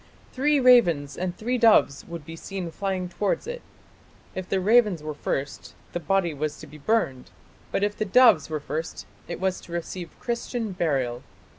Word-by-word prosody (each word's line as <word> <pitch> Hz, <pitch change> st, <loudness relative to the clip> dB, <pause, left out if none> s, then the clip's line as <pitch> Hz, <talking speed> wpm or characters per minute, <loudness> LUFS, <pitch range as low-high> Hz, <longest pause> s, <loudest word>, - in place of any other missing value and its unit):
"Three 290 Hz, +2 st, +2 dB
ravens 175 Hz, -, +5 dB
and 180 Hz, -1 st, -3 dB
three 245 Hz, +3 st, -1 dB
doves 220 Hz, -11 st, +5 dB
would 170 Hz, -3 st, -8 dB
be 165 Hz, -, -8 dB
seen 180 Hz, 0 st, -6 dB
flying 190 Hz, 0 st, -2 dB
towards 200 Hz, -, -1 dB
it. -, -, -5 dB, 0.7 s
If 185 Hz, -1 st, -6 dB
the 195 Hz, -, +1 dB
ravens 210 Hz, -4 st, +3 dB
were 155 Hz, 0 st, -4 dB
first 145 Hz, -1 st, -4 dB, 0.2 s
the 175 Hz, -, -1 dB
body 185 Hz, -2 st, +1 dB
was 150 Hz, +1 st, -3 dB
to -, -, -8 dB
be 150 Hz, +1 st, -13 dB
burned, 140 Hz, -, 0 dB, 0.4 s
but 195 Hz, -, 0 dB
if 205 Hz, 0 st, 0 dB
the -, -, -1 dB
doves 210 Hz, -, +5 dB
were 155 Hz, -1 st, -2 dB
first 155 Hz, +3 st, -5 dB, 0.2 s
it -, -, -5 dB
was 185 Hz, 0 st, -1 dB
to -, -, -14 dB
receive 170 Hz, +1 st, -6 dB
Christian 235 Hz, -2 st, -3 dB
burial. 135 Hz, -9 st, -1 dB
185 Hz, 175 wpm, -25 LUFS, 155-220 Hz, 0.7 s, ravens